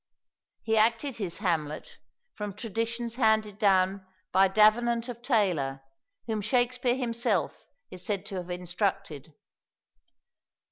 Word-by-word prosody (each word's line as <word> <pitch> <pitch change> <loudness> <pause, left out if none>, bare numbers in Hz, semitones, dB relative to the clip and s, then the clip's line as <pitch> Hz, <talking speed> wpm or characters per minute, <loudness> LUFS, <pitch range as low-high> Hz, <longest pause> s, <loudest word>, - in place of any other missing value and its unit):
He 220 0 +1
acted 230 +4 +2
his 190 -6 -1
Hamlet 160 -7 -2 0.3
from 210 -2 -6
traditions 230 +2 -3
handed 220 -3 +2
down 195 -2 +3 0.3
by 195 +1 +5
Davenant 230 +4 +3
of 235 -1 -7
Taylor, 175 - 0 0.4
whom 220 -2 -2
Shakspere 245 +2 +1
himself 235 -2 0 0.4
is 180 - -9
said 205 -4 -2
to 195 - -5
have 180 -1 -6
instructed. 180 -4 -3
210 Hz, 110 wpm, -28 LUFS, 185-230 Hz, 0.4 s, by